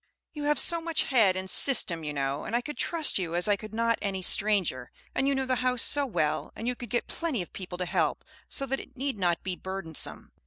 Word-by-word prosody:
You 295 -2 -5
have 295 0 +2
so 335 -1 +2
much 330 -2 0
head 220 -8 +3
and 185 0 -4
system, 185 - +5
you 150 - -3
know, 140 0 -2
and 230 - -3
I 240 - +2
could 295 +4 -7
trust 325 - +1
you 170 -2 -3
as 175 +3 +3
I 205 - +4
could 215 +1 -10
not 230 +1 0
any 195 -2 -3
stranger, 195 -11 +2 0.2
and 270 - 0
you 280 - +2
know 265 0 -1
the 255 -1 0
house 250 -1 +1
so 290 -1 +2
well; 155 - -1
and 230 - -5
you 250 - +1
could 240 -2 -9
get 240 +2 -1
plenty 305 - -3
of - - -16
people 180 -2 -7
to 180 - -2
help, - - -1 0.2
so 275 - 0
that 270 0 -2
it - - -13
need 270 -4 -1
not 175 -2 0
be 185 -1 -3
burdensome. 190 -4 -4
215 Hz, 245 wpm, -28 LUFS, 180-270 Hz, 0.2 s, system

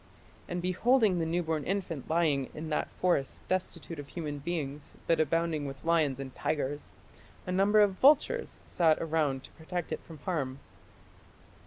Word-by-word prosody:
And 175 0 -3
beholding 200 +1 +3
the 165 - 0
newborn 160 -2 0
infant 180 -7 -3
lying 155 -5 +2
in 155 +1 -5
that 150 - 0
forest 175 -7 0
destitute 185 -3 -3
of 145 - -7
human 150 -2 -5
beings 150 -2 -4
but 165 - +2
abounding 160 -1 +1
with 135 +2 -9
lions 155 -5 +2
and 135 -1 -6
tigers, 145 -1 -2 0.5
a 180 - -3
number 200 +3 +4
of 195 -2 +2
vultures 305 - +4
sat 160 -3 +3
around 150 -5 0
to - - -13
protect 175 +1 -5
it - - -3
from 160 - -12
harm." 140 -5 -2
165 Hz, 155 wpm, -30 LUFS, 145-180 Hz, 0.5 s, number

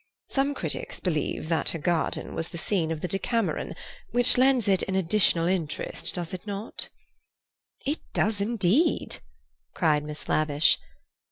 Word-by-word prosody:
Some 280 +1 +1
critics - - -3
believe 155 -3 -2
that 165 - +1
her - - -3
garden 165 +1 -1
was 165 - -2
the 170 - -7
scene 170 -1 0
of 160 -2 -3
The - - -1
Decameron, 225 +4 -1 0.3
which 245 0 +5
lends 255 -2 +4
it 190 -2 +3
an 190 - 0
additional 175 -2 +4
interest, 175 -4 -2
does 175 -1 -4
it 185 +3 -6
not?" 205 +2 -4 1.0
"It 290 +4 0
does 210 -1 +1
indeed!" 230 - +2 0.6
cried 150 -2 +2
Miss 150 0 -7
Lavish. 150 0 +3
185 Hz, 145 wpm, -27 LUFS, 165-225 Hz, 1.0 s, which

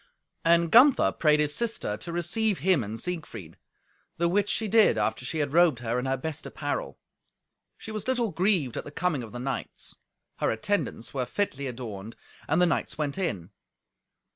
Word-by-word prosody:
And 170 0 +3
Gunther 260 +4 +6
prayed 150 -2 +3
his 150 -1 +1
sister 230 - -1
to 140 +10 -8
receive 185 +5 0
him 180 -8 +2
and 110 +2 -6
Siegfried. 120 - -5 0.6
The 170 - +2
which 205 +3 +1
she 220 - 0
did 220 +1 +5
after - - 0
she 140 +6 -2
had 145 -2 -1
robed 170 -5 +5
her 120 +1 -1
in 130 - -3
her 135 0 0
best 160 +3 -5
apparel. - - -4 0.8
She 220 - -8
was 215 +1 -5
little 245 -5 +1
grieved 175 - +1
at - - -3
the - - -8
coming 155 -2 -1
of 115 -3 -8
the 120 - -7
knights. 125 -1 -5 0.4
Her - - +1
attendants 140 - -2
were 130 -3 -2
fitly 140 -6 -2
adorned, 115 -4 -7 0.3
and 160 +3 +2
the 180 - +5
knights 170 - -1
went 150 +2 -2
in. 100 - -3
160 Hz, 180 wpm, -27 LUFS, 125-190 Hz, 0.8 s, Gunther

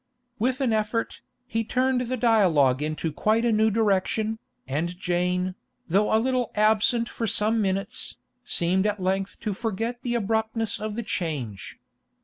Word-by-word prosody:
With 255 +4 0
an 250 -4 +2
effort, 215 +1 -1 0.2
he 225 -3 -1
turned 255 +2 +1
the 250 +1 -2
dialogue 175 - +3
into 155 +1 -2
quite 220 +7 +1
a 235 - +3
new 220 0 +3
direction, 215 +1 +1 0.3
and 165 +6 -2
Jane, 180 0 0 0.3
though 200 +5 +2
a 220 - +5
little 250 +1 0
absent 220 +2 +3
for 230 - -3
some 215 +2 +2
minutes, 195 -1 -2 0.3
seemed 185 +3 +2
at 210 -1 -1
length 190 +1 -1
to 210 - -2
forget 225 +3 -3
the 240 -2 -2
abruptness 220 0 -1
of 215 -1 -4
the 235 - -3
change. 145 - -4
215 Hz, 150 wpm, -25 LUFS, 185-230 Hz, 0.3 s, a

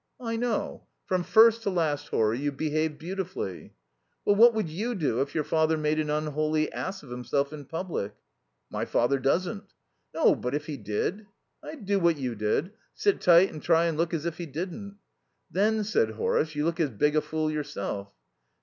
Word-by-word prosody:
"I 230 -2 -3
know. 230 -1 -2 0.2
From 185 -1 0
first 225 +4 +6
to 210 - -1
last, 155 -6 0
Horry, 110 +2 +1
you 145 +1 -1
behaved 155 +1 -1
beautifully." 180 - -5 0.5
"Well, 205 - +4
what 230 +2 +7
would 215 -5 0
you 215 +10 -3
do 140 - 0
if 140 0 -3
your 155 - +1
father 160 +1 +2
made 155 0 0
an 150 -1 -1
unholy 155 +1 0
ass 190 -1 -4
of 130 - -12
himself 125 +4 -1
in 145 -2 -8
public?" 160 - -4 0.6
"My - - -2
father 130 +3 +1
doesn't." 180 - 0 0.5
"No, - - +4
but 125 +3 -3
if 150 0 -3
he 150 -2 -5
did?" 130 - -3 0.3
"I'd 295 -9 -9
do 200 0 +2
what 170 -3 +3
you 130 -3 -2
did. 110 - -1 0.2
Sit 405 -1 +1
tight 175 +2 +6
and 155 - -7
try 165 0 +3
and 165 -2 0
look 165 +1 0
as 165 -2 -2
if 170 0 -3
he 170 - -4
didn't." 190 - -6 0.5
"Then," 215 +3 +2
said 200 - +1
Horace, 150 +7 0
"you 150 +1 0
look 170 +1 -1
as 155 -4 +2
big 150 +7 +1
a 155 - +4
fool 155 0 -2
yourself." 100 -9 -4
155 Hz, 190 wpm, -27 LUFS, 145-190 Hz, 0.6 s, what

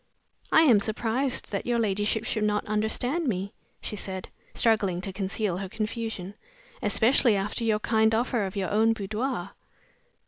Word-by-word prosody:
"I 320 - +7
am 245 -9 +6
surprised 225 +5 -1
that 200 - -3
your 240 -1 +2
ladyship 210 0 0
should 220 -1 -1
not 210 -1 +1
understand 245 +9 -1
me," 195 -3 -2 0.3
she - - -4
said, 190 -2 -5 0.3
struggling 205 -6 +2
to 190 0 -5
conceal 195 -1 -1
her 190 0 -5
confusion. 215 -3 -4 0.5
"Especially 235 -1 +3
after 200 +4 -2
your 220 -2 +2
kind 220 0 +2
offer 235 -1 0
of 190 - -8
your 190 -3 -2
own 220 +2 +4
boudoir." 215 -1 -3
215 Hz, 150 wpm, -27 LUFS, 200-230 Hz, 0.5 s, I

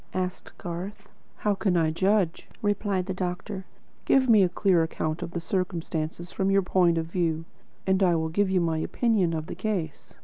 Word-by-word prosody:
asked 185 -1 -4
Garth. 195 +4 -6 0.3
"How 210 - 0
can 195 -2 +1
I 160 -2 +2
judge?" 190 0 +1
replied 205 -2 0
the 190 - -3
doctor. 185 +2 -4 0.4
"Give 265 -1 +4
me 220 -4 +7
a 185 - +4
clear 180 -1 +3
account 160 0 -2
of 175 - -4
the 175 - -4
circumstances 170 -2 -3
from 190 0 0
your 195 0 +4
point 180 -2 +3
of 165 - 0
view, 165 -1 -1 0.4
and 190 0 +2
I 180 -3 +4
will 160 0 0
give 200 +4 +1
you 185 -1 +2
my 165 -2 0
opinion 195 -3 +1
of 155 -1 -3
the - - -6
case." 185 -5 -4
180 Hz, 190 wpm, -27 LUFS, 165-195 Hz, 0.4 s, me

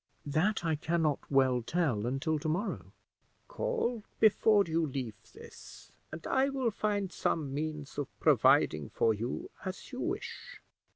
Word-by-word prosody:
"That 170 +7 +1
I 160 -1 +2
can 165 +2 0
not 150 -3 +2
well 130 -3 +3
tell 120 -6 0
until 150 +5 0
to 155 +1 -2
morrow." 180 +8 -2 0.6
"Call - - -1 0.2
before 215 -1 +5
you 165 0 0
leave 130 -5 -4 0.2
this, - - -13 0.2
and 155 +1 -8
I 265 +1 +2
will 265 -4 0
find 205 -3 -1
some 145 -6 -1
means 150 -1 -4
of 145 - -2
providing 75 -3 +4
for 115 - +2
you 115 +4 -4
as 190 +7 -6
you 255 - -6
wish." - - -5
160 Hz, 150 wpm, -31 LUFS, 135-205 Hz, 0.6 s, before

